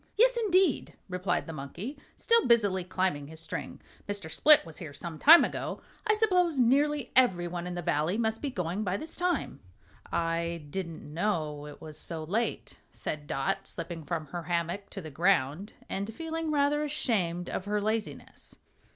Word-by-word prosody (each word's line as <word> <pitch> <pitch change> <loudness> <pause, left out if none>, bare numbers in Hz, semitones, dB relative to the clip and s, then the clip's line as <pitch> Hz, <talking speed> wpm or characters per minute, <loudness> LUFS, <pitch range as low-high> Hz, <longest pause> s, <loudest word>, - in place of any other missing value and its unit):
"Yes, - - +5
indeed," 380 - +2
replied 180 0 -1
the 165 - -7
monkey, 160 - -6 0.2
still 465 -1 +4
busily 205 -6 +4
climbing 180 -5 -1
his 160 +1 -10
string; 165 - -5 0.3
"Mr. 200 -6 -3
Split 300 - +7
was 160 -2 -8
here 155 -5 -7
some 160 +1 -6
time 330 +3 +9
ago. - - -4 0.3
I 430 - +4
suppose 365 -7 +2
nearly 275 +2 +2
everyone 175 -8 +3
in 180 - -4
the 175 - -4
Valley 155 +6 +1
must 220 -1 0
be 285 - -1
going 185 -3 -2
by 190 -1 -1
this 315 - -5
time." 360 0 -1 0.5
"I 170 -1 -1
didn't 170 -3 -5
know 155 -5 -1
it 145 - -11
was 155 -1 -9
so 160 -2 -4
late," 210 +9 -2
said 150 -1 -5
Dot, 135 -1 -1
slipping 165 -1 -4
from 155 +1 -3
her 175 +4 -5
hammock 170 +3 -2
to 195 - -6
the 155 -3 -8
ground 170 +3 +1
and 200 +3 -3
feeling 325 +5 -4
rather 295 0 +2
ashamed 195 - 0
of 185 - -4
her 210 +1 0
laziness. 215 +1 -3
185 Hz, 170 wpm, -29 LUFS, 165-260 Hz, 0.5 s, time